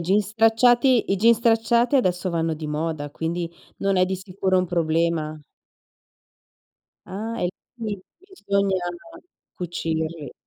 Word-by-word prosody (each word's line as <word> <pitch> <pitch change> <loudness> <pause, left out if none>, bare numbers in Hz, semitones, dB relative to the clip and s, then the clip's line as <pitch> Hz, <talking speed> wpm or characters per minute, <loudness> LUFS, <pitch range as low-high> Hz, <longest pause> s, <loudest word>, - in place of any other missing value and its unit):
jeans 200 +1 +3
stracciati 235 +2 +4
i - - +2
jeans 230 +4 +5
stracciati 235 +3 +3
adesso 185 -6 +1
vanno 165 -1 0
di 155 0 -6
moda, 150 -1 -3
quindi 170 +2 -3 0.3
non 195 -1 +1
è 185 - +5
di 190 +1 -2
sicuro 190 0 0
un 185 - +1
problema. 165 -2 0 1.7
Ah, 220 +4 -5
e 175 - 0 0.3
quindi 210 -5 -5 0.2
bisogna 200 - -1 0.8
cucirli. 160 - -3
185 Hz, 120 wpm, -23 LUFS, 165-225 Hz, 1.7 s, jeans